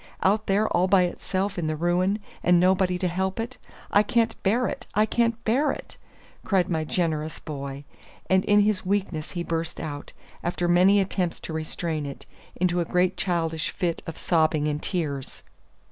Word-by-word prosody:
Out 210 Hz, +3 st, +2 dB
there 205 Hz, +2 st, +3 dB
all 180 Hz, -, +2 dB
by 190 Hz, -1 st, +5 dB
itself 185 Hz, +2 st, -2 dB
in 160 Hz, -, -1 dB
the 155 Hz, -, -1 dB
ruin, 175 Hz, +5 st, +1 dB, 0.2 s
and 175 Hz, 0 st, +4 dB
nobody 185 Hz, 0 st, +3 dB
to 180 Hz, -, 0 dB
help 190 Hz, +4 st, -2 dB
it! 235 Hz, +3 st, -4 dB, 0.3 s
I 205 Hz, -, +6 dB
can't 225 Hz, +1 st, +1 dB
bear 230 Hz, +6 st, +2 dB
it! 245 Hz, -, -4 dB
I 215 Hz, +1 st, +4 dB
can't 230 Hz, 0 st, 0 dB
bear 270 Hz, +6 st, +2 dB
it!" -, -, -8 dB, 0.5 s
cried 190 Hz, -4 st, +1 dB
my 160 Hz, -2 st, 0 dB
generous 155 Hz, -1 st, -1 dB
boy. 140 Hz, -2 st, -6 dB, 0.4 s
And 190 Hz, 0 st, +3 dB
in 205 Hz, 0 st, +5 dB
his 205 Hz, -2 st, +1 dB
weakness 185 Hz, -5 st, -2 dB
he 175 Hz, -, -2 dB
burst 165 Hz, -1 st, -3 dB
out, 145 Hz, -3 st, -6 dB, 0.3 s
after 175 Hz, 0 st, -1 dB
many 185 Hz, +4 st, +5 dB
attempts 185 Hz, -3 st, -1 dB
to 160 Hz, -, -6 dB
restrain 160 Hz, -1 st, -3 dB
it, 140 Hz, -, -8 dB, 0.3 s
into 180 Hz, 0 st, +1 dB
a 170 Hz, -, +1 dB
great 180 Hz, +2 st, +1 dB
childish 165 Hz, -4 st, -1 dB
fit 175 Hz, -3 st, -2 dB
of 165 Hz, -, -6 dB
sobbing 155 Hz, -3 st, +2 dB
and 150 Hz, 0 st, -2 dB
tears. 145 Hz, -7 st, -3 dB
180 Hz, 175 wpm, -25 LUFS, 160-200 Hz, 0.5 s, I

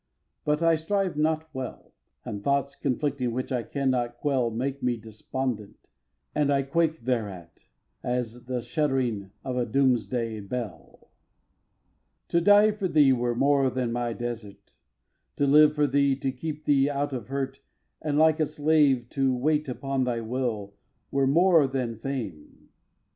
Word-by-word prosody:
But 150 Hz, +2 st, +1 dB
I 165 Hz, -1 st, +4 dB
strive 190 Hz, +2 st, -1 dB
not 155 Hz, +1 st, 0 dB
well; 130 Hz, -2 st, -7 dB, 0.3 s
And 100 Hz, -2 st, -5 dB
thoughts 140 Hz, +1 st, 0 dB
conflicting 135 Hz, -3 st, -1 dB
which 130 Hz, +2 st, -3 dB
I 125 Hz, -2 st, 0 dB
cannot 125 Hz, -2 st, -1 dB
quell 130 Hz, -4 st, +1 dB
Make 130 Hz, +5 st, -3 dB
me 125 Hz, -1 st, 0 dB
despondent; 110 Hz, 0 st, -5 dB, 0.4 s
and 145 Hz, -1 st, +2 dB
I 140 Hz, -1 st, +2 dB
quake 160 Hz, +2 st, 0 dB
thereat, 100 Hz, -9 st, -3 dB, 0.4 s
As 125 Hz, -2 st, -2 dB
at 120 Hz, -1 st, -16 dB
the 125 Hz, -1 st, -2 dB
shuddering 125 Hz, -, -1 dB
of 130 Hz, -2 st, -3 dB
a 125 Hz, -, +1 dB
doomsday 120 Hz, -3 st, +1 dB
bell. 100 Hz, -4 st, -6 dB
iv. -, -, -28 dB, 1.2 s
To 170 Hz, -, +2 dB
die 205 Hz, +3 st, +6 dB
for 205 Hz, -2 st, -2 dB
thee 145 Hz, -5 st, +5 dB
were 120 Hz, -1 st, 0 dB
more 140 Hz, +1 st, +3 dB
than 125 Hz, -2 st, -2 dB
my 120 Hz, 0 st, -1 dB
desert; 115 Hz, -4 st, -7 dB, 0.6 s
To 145 Hz, -, +1 dB
live 150 Hz, +2 st, +6 dB
for 150 Hz, -1 st, +3 dB
thee 140 Hz, 0 st, +2 dB
to 135 Hz, 0 st, -2 dB
keep 150 Hz, +3 st, -6 dB
thee 140 Hz, -1 st, +3 dB
out 145 Hz, 0 st, -2 dB
of 120 Hz, -5 st, -5 dB
hurt 135 Hz, 0 st, -3 dB, 0.4 s
And, 150 Hz, -2 st, -1 dB
like 160 Hz, 0 st, +4 dB
a 155 Hz, -, +2 dB
slave, 145 Hz, -5 st, +2 dB
to 135 Hz, -2 st, +1 dB
wait 150 Hz, +2 st, +1 dB
upon 135 Hz, +1 st, -1 dB
thy 120 Hz, -2 st, -1 dB
will 110 Hz, -4 st, -3 dB, 0.4 s
Were 135 Hz, -1 st, +2 dB
more 165 Hz, 0 st, +5 dB
than 130 Hz, -3 st, -2 dB
fame. 110 Hz, -, -6 dB
135 Hz, 155 wpm, -27 LUFS, 120-150 Hz, 1.2 s, die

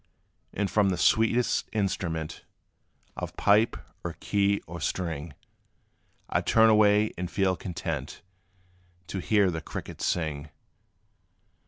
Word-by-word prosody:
And 100 Hz, 0 st, -1 dB
from 105 Hz, -2 st, +3 dB
the 90 Hz, -, 0 dB
sweetest 115 Hz, +6 st, +2 dB
instrument 85 Hz, -6 st, -2 dB, 0.7 s
Of -, -, -6 dB
pipe, 105 Hz, +3 st, +3 dB, 0.3 s
or 85 Hz, -1 st, -5 dB
key, 100 Hz, 0 st, +1 dB
or 85 Hz, 0 st, -8 dB
string, 80 Hz, -2 st, -3 dB, 0.9 s
I -, -, 0 dB
'd -, -, -15 dB
turn 110 Hz, 0 st, +6 dB
away, 105 Hz, 0 st, +4 dB
and 90 Hz, -1 st, -3 dB
feel 95 Hz, -1 st, +1 dB
content 90 Hz, 0 st, -5 dB, 0.9 s
To 95 Hz, -, -3 dB
hear 100 Hz, 0 st, +3 dB
the 80 Hz, -1 st, -4 dB
crickets -, -, -7 dB
sing. 75 Hz, -3 st, -1 dB
95 Hz, 120 wpm, -27 LUFS, 85-105 Hz, 0.9 s, turn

